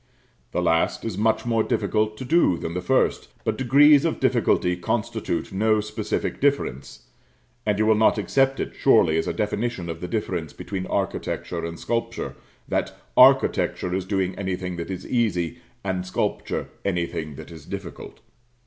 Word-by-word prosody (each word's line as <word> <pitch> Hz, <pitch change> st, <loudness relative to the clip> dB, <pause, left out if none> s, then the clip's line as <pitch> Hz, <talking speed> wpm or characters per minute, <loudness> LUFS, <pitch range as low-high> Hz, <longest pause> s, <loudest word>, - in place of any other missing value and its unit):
The -, -, -1 dB
last 80 Hz, +6 st, +1 dB
is 110 Hz, -5 st, -3 dB
much 110 Hz, +4 st, +1 dB
more 115 Hz, -2 st, +2 dB
difficult 110 Hz, 0 st, 0 dB
to 130 Hz, -, -6 dB
do 155 Hz, -, +3 dB
than 80 Hz, -, -5 dB
the 90 Hz, -, -2 dB
first; 90 Hz, -, +1 dB, 0.2 s
but -, -, 0 dB
degrees 140 Hz, +3 st, +6 dB
of 165 Hz, -, -1 dB
difficulty 120 Hz, -8 st, +2 dB
constitute 105 Hz, 0 st, -2 dB
no 110 Hz, +2 st, +2 dB
specific 105 Hz, 0 st, -3 dB
difference, 135 Hz, -, -1 dB, 0.6 s
and 105 Hz, -1 st, +2 dB
you 110 Hz, -, +2 dB
will 110 Hz, -, +5 dB
not 110 Hz, +1 st, +3 dB
accept 135 Hz, +5 st, +1 dB
it, -, -, -3 dB
surely, 80 Hz, -, +4 dB
as -, -, -2 dB
a -, -, +1 dB
definition 105 Hz, -3 st, -2 dB
of 80 Hz, -, -8 dB
the 90 Hz, -, -4 dB
difference 90 Hz, -5 st, -3 dB
between 95 Hz, -2 st, -5 dB
architecture 90 Hz, -3 st, -2 dB
and 85 Hz, 0 st, -5 dB
sculpture, 115 Hz, 0 st, -3 dB, 0.3 s
that -, -, -2 dB, 0.2 s
"architecture 90 Hz, -, +4 dB
is 95 Hz, 0 st, -1 dB
doing 95 Hz, -1 st, 0 dB
anything 90 Hz, -2 st, -3 dB
that 85 Hz, -, -5 dB
is 95 Hz, -1 st, -5 dB
easy, 105 Hz, -9 st, 0 dB, 0.2 s
and 95 Hz, -2 st, -2 dB
sculpture 90 Hz, -, -2 dB
anything 85 Hz, -5 st, -2 dB
that -, -, -10 dB
is 80 Hz, -2 st, -12 dB
difficult." 100 Hz, -3 st, -8 dB
100 Hz, 160 wpm, -24 LUFS, 90-115 Hz, 0.6 s, degrees